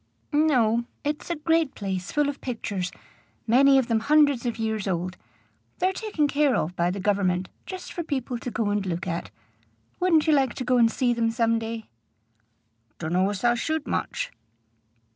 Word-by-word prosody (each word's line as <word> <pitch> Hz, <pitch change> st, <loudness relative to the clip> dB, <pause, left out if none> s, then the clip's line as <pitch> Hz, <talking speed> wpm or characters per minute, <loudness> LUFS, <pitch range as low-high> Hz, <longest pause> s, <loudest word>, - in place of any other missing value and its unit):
"No. 245 Hz, -7 st, +3 dB, 0.2 s
It's 295 Hz, +3 st, -3 dB
a 340 Hz, -, 0 dB
great 325 Hz, -1 st, +1 dB
place 190 Hz, -2 st, -4 dB
full 295 Hz, -1 st, +2 dB
of 285 Hz, -1 st, -4 dB
pictures, 205 Hz, -7 st, -3 dB, 0.5 s
many 270 Hz, +4 st, +6 dB
of 265 Hz, -, +3 dB
them 230 Hz, -1 st, +1 dB
hundreds 285 Hz, -1 st, +3 dB
of 235 Hz, -, -2 dB
years 220 Hz, -2 st, -2 dB
old. 180 Hz, 0 st, -2 dB, 0.6 s
They're 370 Hz, +1 st, +1 dB
taken 380 Hz, -8 st, 0 dB
care 285 Hz, -2 st, +2 dB
of 175 Hz, +4 st, -1 dB
by 175 Hz, 0 st, +1 dB
the 190 Hz, +2 st, -3 dB
Government, 185 Hz, -2 st, +1 dB, 0.2 s
just 370 Hz, -1 st, -7 dB
for 345 Hz, -, -3 dB
people 265 Hz, -6 st, -3 dB
to 245 Hz, -, -5 dB
go 220 Hz, -3 st, -1 dB
and 205 Hz, -1 st, 0 dB
look 175 Hz, -2 st, -3 dB
at. 170 Hz, -1 st, -3 dB, 0.7 s
Wouldn't 340 Hz, -4 st, +4 dB
you 315 Hz, -, +4 dB
like 270 Hz, -4 st, +2 dB
to -, -, -3 dB
go 250 Hz, 0 st, +3 dB
and 230 Hz, -1 st, +5 dB
see 245 Hz, -1 st, +1 dB
them 230 Hz, -1 st, +1 dB
some 230 Hz, 0 st, +1 dB
day?" 225 Hz, 0 st, -5 dB, 1.1 s
"Donno 180 Hz, +4 st, +1 dB
as 205 Hz, +1 st, -4 dB
I 240 Hz, 0 st, +5 dB
should 315 Hz, +5 st, -2 dB
much." -, -, -2 dB
235 Hz, 180 wpm, -25 LUFS, 205-290 Hz, 1.1 s, many